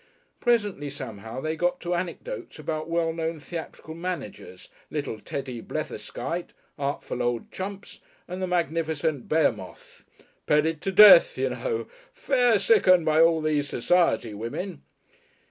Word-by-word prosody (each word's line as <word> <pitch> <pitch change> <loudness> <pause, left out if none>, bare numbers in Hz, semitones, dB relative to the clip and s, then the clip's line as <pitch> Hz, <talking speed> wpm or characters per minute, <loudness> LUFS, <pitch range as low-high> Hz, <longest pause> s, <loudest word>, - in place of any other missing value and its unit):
Presently 205 - +1
somehow 115 -3 -7
they 155 - -2
had 160 - -6
got 175 0 +1
to 175 0 -2
anecdotes 180 - -5
about 155 0 -4
well 165 -1 0
known 165 -1 -3
theatrical 160 0 -8
managers, 165 - -6 0.2
little 145 -7 -4
Teddy 130 0 -5
Bletherskite, 165 +11 -5 0.3
artful 140 -3 -3
old 120 -1 -2
Chumps, 195 +1 -7 0.3
and 185 +1 -6
the 185 - -1
magnificent 160 -4 -1
Behemoth, 160 -1 -1 0.4
"petted 155 +1 +2
to 195 - -2
death, - - +8
you - - 0
know, 475 -3 -3 0.3
fair 250 - +3
sickened, 185 -5 +4
by 155 0 +4
all 165 -1 +4
these 150 -2 0
society 120 -7 +1
women." 140 - -5
160 Hz, 130 wpm, -26 LUFS, 145-185 Hz, 0.4 s, death